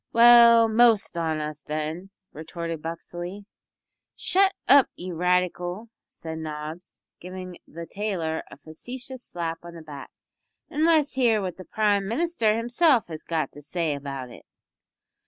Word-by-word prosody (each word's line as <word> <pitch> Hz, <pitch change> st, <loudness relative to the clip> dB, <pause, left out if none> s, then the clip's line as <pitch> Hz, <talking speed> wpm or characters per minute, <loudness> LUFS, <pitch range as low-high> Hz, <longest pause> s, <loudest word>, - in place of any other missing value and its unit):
"Well, 235 Hz, -1 st, +8 dB
the 220 Hz, -, -4 dB
most 230 Hz, -5 st, +4 dB
on 160 Hz, -2 st, -1 dB
us, 150 Hz, -1 st, -5 dB
then," 155 Hz, +5 st, -4 dB, 0.2 s
retorted 165 Hz, +1 st, -6 dB
Buxley. 175 Hz, +4 st, -7 dB, 0.7 s
"Shut 385 Hz, +1 st, +2 dB
up, 280 Hz, -2 st, +6 dB
you 180 Hz, 0 st, -7 dB
radical!" 180 Hz, +4 st, -1 dB, 0.2 s
said 160 Hz, -1 st, -8 dB
Nobbs, 155 Hz, +2 st, -7 dB, 0.2 s
giving 185 Hz, 0 st, -8 dB
the 170 Hz, +1 st, -8 dB
tailor 175 Hz, -6 st, -3 dB
a -, -, -12 dB
facetious 245 Hz, +10 st, -8 dB
slap 165 Hz, -1 st, -4 dB
on 170 Hz, 0 st, -10 dB
the 165 Hz, -, -10 dB
back, 145 Hz, -3 st, -9 dB, 0.6 s
"an' 305 Hz, +2 st, +1 dB
let's 315 Hz, -3 st, +3 dB
hear 240 Hz, -5 st, +3 dB
what 185 Hz, -3 st, -4 dB
the 185 Hz, -, -10 dB
Prime 205 Hz, -2 st, +1 dB
Minister 230 Hz, -, +1 dB
himself 240 Hz, -, +2 dB
has 155 Hz, -1 st, -6 dB
got 160 Hz, -2 st, -2 dB
to 145 Hz, -, -12 dB
say 160 Hz, +1 st, -2 dB
about 135 Hz, -3 st, -6 dB
it." -, -, -14 dB
180 Hz, 145 wpm, -25 LUFS, 160-230 Hz, 0.7 s, Well